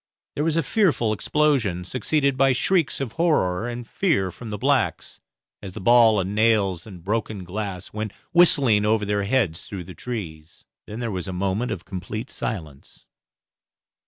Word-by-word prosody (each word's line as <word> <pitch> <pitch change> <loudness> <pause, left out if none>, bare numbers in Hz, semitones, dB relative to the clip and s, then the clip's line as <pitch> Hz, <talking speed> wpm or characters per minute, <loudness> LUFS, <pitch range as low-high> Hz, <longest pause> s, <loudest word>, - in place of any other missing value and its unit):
There 145 - -2
was 165 0 +1
a 165 - +2
fearful 160 - +2
explosion, 115 -7 +1
succeeded 140 - 0
by 135 0 +4
shrieks 170 +4 +1
of 135 -5 -3
horror 110 - +1
and 120 0 -6
fear 110 - 0
from 115 +3 -10
the 105 - -4
blacks, - - 0 0.4
as 95 -3 -8
the 110 - -7
ball 115 0 +5
and 95 +1 -2
nails 105 -5 +2
and 90 -5 -11
broken 105 -1 -2
glass 95 0 -5
went 110 -1 -4 0.2
whistling 140 -11 +5
over 105 0 +2
their 100 0 0
heads 100 -8 0
through 100 -6 -6
the 90 +2 -10
trees. 85 -9 -7 0.2
Then 110 +3 -6
there 115 -2 -2
was 95 0 -4
a 95 - -4
moment 100 +6 -1
of 85 - -5
complete 100 +5 -6
silence. 80 -10 -6
110 Hz, 165 wpm, -23 LUFS, 95-125 Hz, 0.4 s, ball